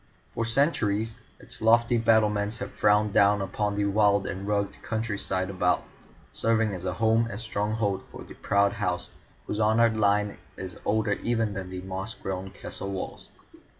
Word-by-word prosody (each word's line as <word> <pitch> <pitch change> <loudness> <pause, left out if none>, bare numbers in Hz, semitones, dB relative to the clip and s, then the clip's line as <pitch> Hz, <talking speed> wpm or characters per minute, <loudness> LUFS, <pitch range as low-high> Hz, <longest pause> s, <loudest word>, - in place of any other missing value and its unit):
For 115 - -2
centuries 115 -4 +1 0.2
its - - -6
lofty 115 +2 +4
battlements 105 -1 +2
have - - -6
frowned 105 0 +2
down 100 +1 +5
upon 100 +1 -2
the 100 0 +1
wild 100 -1 +3
and 95 +1 -5
rugged 100 -1 -1
countryside 100 -4 -2
about, 90 -1 +1 0.5
serving 115 -2 +1
as 90 -1 -6
a 90 - -1
home 115 +4 +2
and 105 - -5
stronghold 105 -2 -1
for - - -10
the - - -12
proud 100 0 +2
house - - -1 0.3
whose 105 - -3
honoured 110 +1 +4
line 105 -1 +1 0.2
is 95 -2 -7
older 110 0 +1
even 115 -3 0
than 95 -2 -5
the 90 0 -6
moss 95 +3 -5
grown 95 0 -5
castle 100 - -6
walls. 95 -1 -6
105 Hz, 160 wpm, -27 LUFS, 100-110 Hz, 0.5 s, down